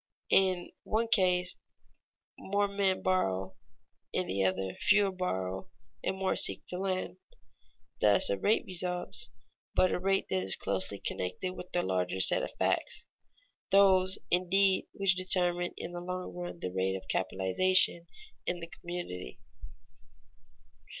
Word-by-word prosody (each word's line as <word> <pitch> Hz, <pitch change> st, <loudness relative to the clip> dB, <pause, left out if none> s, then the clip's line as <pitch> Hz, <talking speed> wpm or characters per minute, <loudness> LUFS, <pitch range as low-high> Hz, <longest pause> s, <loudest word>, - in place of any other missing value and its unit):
In 185 Hz, -2 st, +4 dB
the -, -, -16 dB
one 225 Hz, +1 st, -1 dB
case, 180 Hz, -4 st, +2 dB, 0.8 s
more 200 Hz, +1 st, -1 dB
men 200 Hz, -1 st, 0 dB
borrow; 95 Hz, -, 0 dB, 0.6 s
in -, -, -1 dB
the 95 Hz, +1 st, -1 dB
other, 95 Hz, 0 st, -1 dB
fewer 205 Hz, -1 st, +3 dB
borrow 95 Hz, -, -3 dB, 0.3 s
and 190 Hz, -, -2 dB
more 190 Hz, 0 st, 0 dB
seek -, -, +4 dB
to 180 Hz, -, -5 dB
lend. 185 Hz, -1 st, -3 dB, 0.8 s
Thus 105 Hz, -1 st, +5 dB
a -, -, +2 dB
rate 215 Hz, -, +2 dB
results, 180 Hz, -7 st, -2 dB, 0.5 s
but 185 Hz, -, +4 dB
a -, -, -1 dB
rate 195 Hz, +1 st, 0 dB
that 95 Hz, -, 0 dB
is 95 Hz, 0 st, 0 dB
closely 100 Hz, +1 st, -2 dB
connected 90 Hz, -, -3 dB
with 180 Hz, -, -9 dB
larger 95 Hz, -, -1 dB
set -, -, +6 dB
of -, -, -3 dB
facts -, -, -1 dB, 0.6 s
those, 190 Hz, -1 st, +4 dB
indeed, 190 Hz, +2 st, +2 dB
which 195 Hz, -1 st, +3 dB
determine 180 Hz, -1 st, +2 dB
in 175 Hz, -, -6 dB
the 175 Hz, 0 st, -6 dB
long 180 Hz, +1 st, -5 dB
run 175 Hz, -1 st, -7 dB
the 90 Hz, -, -4 dB
rate 95 Hz, 0 st, 0 dB
of 95 Hz, -, -8 dB
capitalization 170 Hz, -, +2 dB, 0.4 s
in 175 Hz, -, -1 dB
the 165 Hz, -, -6 dB
community. 170 Hz, -, -7 dB
180 Hz, 135 wpm, -30 LUFS, -, 0.8 s, set